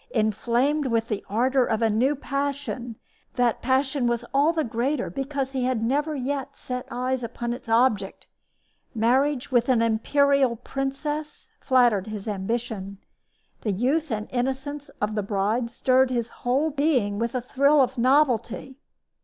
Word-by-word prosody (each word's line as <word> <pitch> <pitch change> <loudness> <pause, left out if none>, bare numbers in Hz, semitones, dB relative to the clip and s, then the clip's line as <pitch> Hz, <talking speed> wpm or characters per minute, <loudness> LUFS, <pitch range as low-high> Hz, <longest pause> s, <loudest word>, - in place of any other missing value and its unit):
Inflamed 240 +7 +1
with 230 -1 0
the 210 -3 -2
ardor 255 +5 +2
of 225 -1 0
a 225 - +3
new 255 +7 +2
passion, 275 -4 -3 0.4
that 245 -2 +1
passion 265 0 +1
was 240 0 -1
all 285 +4 +4
the 325 -2 0
greater 245 +3 -1
because 275 0 -3
he 260 -2 -1
had 250 -3 0
never 290 +6 0
yet 275 +1 -3
set 250 0 -5
eyes 255 +1 -1
upon 235 0 -4
its 245 -1 -9
object. 225 -2 +1 0.7
Marriage 260 +5 +1
with 245 0 +2
an 250 -3 +4
imperial 270 +3 +2
princess 275 +5 -4
flattered 240 -7 +3
his 215 -1 -6
ambition. 205 -1 -3 0.6
The 210 - -1
youth 275 - 0
and 210 -1 -2
innocence 270 +3 -3
of 210 +1 -1
the 210 - 0
bride 210 +4 -1
stirred 255 +2 +2
his 235 -2 -1
whole 270 +8 0
being 265 -9 +1
with 235 +2 -2
a - - +1
thrill 280 +4 +3
of 260 -1 +2
novelty. 260 0 +1
250 Hz, 150 wpm, -25 LUFS, 230-275 Hz, 0.7 s, all